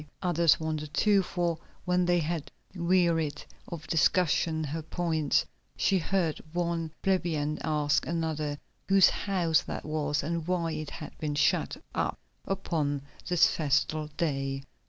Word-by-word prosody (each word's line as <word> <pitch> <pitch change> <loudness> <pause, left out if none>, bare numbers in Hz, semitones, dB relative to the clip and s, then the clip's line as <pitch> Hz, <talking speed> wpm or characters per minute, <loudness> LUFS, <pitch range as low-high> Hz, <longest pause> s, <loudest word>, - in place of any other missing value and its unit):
Others 170 -3 +4
wondered 155 -2 -3
too, 205 -2 +4
for 175 -3 -1 0.3
when 180 0 +2
they 175 0 +4
had 155 -3 -3 0.2
wearied 170 -4 +1 0.2
of 160 -2 -7
discussing 160 -1 +2
her 155 +2 -3
points, 160 -2 0 0.3
she 190 - +3
heard 170 -2 0
one 170 -2 -1
plebeian 160 -6 0
ask 150 -2 +1
another 155 -3 -1 0.3
whose 195 -1 +7
house 175 -5 +1
that - - -6
was 150 -1 -1
and 165 +1 -2
why 175 -2 0
it 155 -1 -4
had 155 - -8
been 150 -2 -2
shut 150 - +2 0.2
up - - -1 0.3
upon 155 -7 -1 0.3
this 175 -2 +6
festal 155 +1 +1
day. 135 -4 -1
160 Hz, 135 wpm, -29 LUFS, 150-175 Hz, 0.3 s, whose